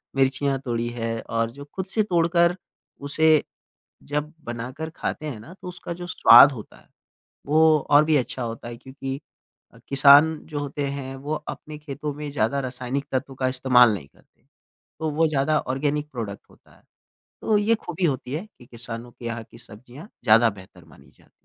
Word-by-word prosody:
मिर्चियाँ 135 0 +1
तोड़ी 120 -1 -1
है। 115 -1 -3
और 115 0 -2
जो 140 +3 -11
खुद 190 -1 -3
से 215 +2 0
तोड़कर 170 -1 +2 0.5
उसे 155 +2 +3 0.6
जब 150 +2 -3
बनाकर 125 +7 -5
खाते 155 - -4
हैं 130 -8 -5
ना 160 +11 -12
तो - - -8
उसका 180 -1 -6
जो 175 +1 -8
स्वाद 140 -4 +8
होता 110 -6 -10
है - - -22 0.6
वो 155 +1 +5
और 145 +1 +7
भी 155 -1 +2
अच्छा 125 -1 -3
होता 115 0 -6
है। 120 0 -7
क्योंकि 135 +1 -7 0.7
किसान 145 +3 +7
जो 150 -2 -4
होते 145 0 -3
हैं 135 -1 -6
वो 145 +3 -4
अपने 150 0 -8
खेतों 150 0 -6
में 150 0 -6
ज़्यादा 140 +1 0
रासायनिक 130 +2 -4
तत्व 135 0 -3
का 130 0 -1
इस्तेमाल 125 -3 +5
नहीं 80 -8 -6
करते। - - -30 0.6
तो 160 -1 -1
वो 165 - +5
ज़्यादा 150 +1 +1 0.2
ऑर्गेनिक 150 +2 -2
प्रोडक्ट 110 -5 -6
होता - - -23
है। - - -26 0.6
तो 215 -2 +2
ये 220 +3 +2
खूबी 175 -4 -4
होती 135 -4 -1
है 180 +8 -4
कि 125 - -16
किसानों 120 0 -8
के 120 - -15
यहाँ 115 -1 -4
की 115 - -14
सब्जियाँ 125 - -12 0.2
ज़्यादा 115 +1 +6
बेहतर 95 -3 -15
मानी 80 -4 -19
जाती - - -27
हैं। - - -26
140 Hz, 180 wpm, -24 LUFS, 120-155 Hz, 0.7 s, स्वाद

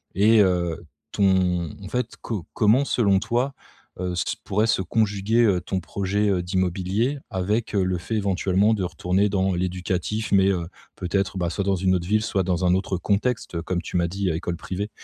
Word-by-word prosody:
et 110 +3 +5
heu, 90 -4 +1 0.3
ton 90 -4 +2
en 95 - -7
fait, 125 0 -2
co 105 -7 -4
comment, 115 +6 +3
selon 100 -8 +2
toi, 120 +5 -1 0.5
heu, 90 - -1
s 90 - -1
pourrait 105 +3 +1
se 100 - +2
conjuguer, 105 +3 +1
heu, 95 -4 +2
ton 95 - -2
projet, 100 +4 -1
heu, 95 -3 +1
d'immobilier 95 +8 0
avec 105 +5 -1
le 95 -2 +1
fait, 95 +6 -4
éventuellement, 100 +1 +2
de 100 -4 -1
retourner 90 +4 0
dans 95 -1 +1
l'éducatif, 90 +4 -2
mais, 95 -1 +5
heu, 85 -3 -1 0.3
peut-être, 95 +1 -1
bah, 85 -2 0
soit 100 - -2
dans 100 - +2
une 95 +1 +2
autre 85 -1 -3
ville, 105 +2 +2
soit 100 -3 0
dans 90 0 0
un 90 - +4
autre 95 0 -1
contexte, 100 -2 -1
comme 90 +1 -2
tu - - -8
m'as 85 -1 +2
dit: 95 +2 -2
«école 85 +1 -2
privée»? 100 +5 -4
95 Hz, 190 wpm, -24 LUFS, 90-105 Hz, 0.5 s, et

